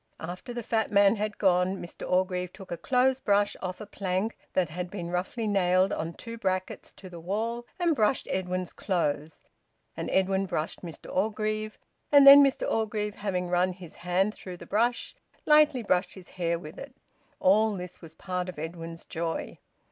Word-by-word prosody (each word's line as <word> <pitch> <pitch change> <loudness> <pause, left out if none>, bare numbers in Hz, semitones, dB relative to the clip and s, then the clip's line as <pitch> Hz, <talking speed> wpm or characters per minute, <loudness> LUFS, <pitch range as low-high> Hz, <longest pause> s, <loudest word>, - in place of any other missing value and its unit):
After 180 +8 -7
the 240 -1 -5
fat 220 0 0
man 200 +1 +5
had 210 0 -3
gone 185 -1 +2
Mr 175 - -8
Orgreave 180 -1 +1
took 190 -1 -12
a - - -1
clothes 255 +7 +2
brush 205 0 +2
off 185 -1 -4
a 215 - -7
plank 195 +1 -2 0.2
that 180 -4 +1
had 180 +3 -5
been 175 -3 -5
roughly 190 +6 -2
nailed 190 -2 +2
on 165 +1 -4
two 230 0 -8
brackets 185 -2 -2
to 190 - -12
the 175 -2 -9
wall, 225 +7 -3
and 345 -3 +2
brushed 220 +1 +1
Edwin's 185 -1 -2
clothes, 155 -5 -2 0.5
and - - -4
Edwin 190 0 +1
brushed 165 -3 -3
Mr 170 -3 -9
Orgreave, 215 +1 -1 0.3
and 285 -1 +8
then 280 +1 +11
Mr 275 -1 +1
Orgreave, 210 -1 -1
having 185 -3 -2
run 180 +1 +1
his 175 -3 -12
hand 180 +4 0
through 185 -4 -9
the 170 - -11
brush, 235 +6 0 0.3
lightly 300 -5 +5
brushed 180 -3 0
his 185 -2 -12
hair 170 -2 -1
with 165 +1 -10
it. 275 -2 -10 0.4
All 210 +3 +4
this 180 -1 -8
was 165 -2 -12
part 180 -1 -3
of 180 - -8
Edwin's 165 +1 -7
joy. 165 0 -4
190 Hz, 180 wpm, -28 LUFS, 180-215 Hz, 0.5 s, then